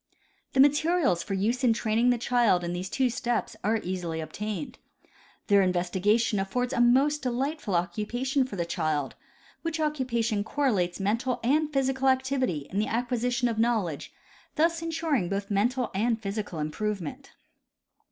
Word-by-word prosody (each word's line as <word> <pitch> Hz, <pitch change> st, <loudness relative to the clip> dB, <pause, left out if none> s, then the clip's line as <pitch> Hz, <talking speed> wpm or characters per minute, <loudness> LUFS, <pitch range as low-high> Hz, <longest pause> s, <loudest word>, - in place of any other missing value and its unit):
■ -, -, -44 dB
The 265 Hz, -, 0 dB
materials 290 Hz, -, +4 dB
for 195 Hz, -, -3 dB
use 230 Hz, +7 st, 0 dB
in 240 Hz, -3 st, +5 dB
training 225 Hz, +2 st, +1 dB
the 245 Hz, -, +3 dB
child 235 Hz, -7 st, +2 dB
in 170 Hz, 0 st, -3 dB
these 180 Hz, +2 st, -4 dB
two 265 Hz, -1 st, +1 dB
steps 240 Hz, -1 st, -2 dB
are 220 Hz, +3 st, +2 dB
easily 175 Hz, -3 st, -3 dB
obtained. 215 Hz, -, -5 dB, 0.7 s
Their 200 Hz, -1 st, +5 dB
investigation 190 Hz, +4 st, +1 dB
affords 245 Hz, +7 st, -1 dB
a -, -, +2 dB
most 275 Hz, +5 st, +4 dB
delight 270 Hz, +5 st, -2 dB
ful 195 Hz, -, -2 dB
occupation 240 Hz, -, 0 dB
for 250 Hz, -, -7 dB
the 170 Hz, -3 st, -1 dB
child, 155 Hz, -5 st, -1 dB, 0.5 s
which 330 Hz, -1 st, -3 dB
occupation 245 Hz, -8 st, 0 dB
correlates 210 Hz, -9 st, 0 dB
mental 230 Hz, +6 st, 0 dB
and 300 Hz, +5 st, +2 dB
physical 270 Hz, -1 st, +1 dB
activity 260 Hz, -, 0 dB
in 195 Hz, -, -1 dB
the 215 Hz, -, +1 dB
acquisition 245 Hz, +1 st, 0 dB
of 225 Hz, -2 st, -2 dB
knowledge, 220 Hz, -10 st, 0 dB, 0.4 s
thus 330 Hz, +1 st, +2 dB
in 330 Hz, -, -3 dB
suring 305 Hz, -, 0 dB
both 200 Hz, +1 st, -3 dB
mental 240 Hz, +4 st, +1 dB
and 225 Hz, +4 st, +1 dB
physical 205 Hz, -3 st, -4 dB
improvement. 170 Hz, +3 st, -4 dB
230 Hz, 155 wpm, -27 LUFS, 195-260 Hz, 0.7 s, in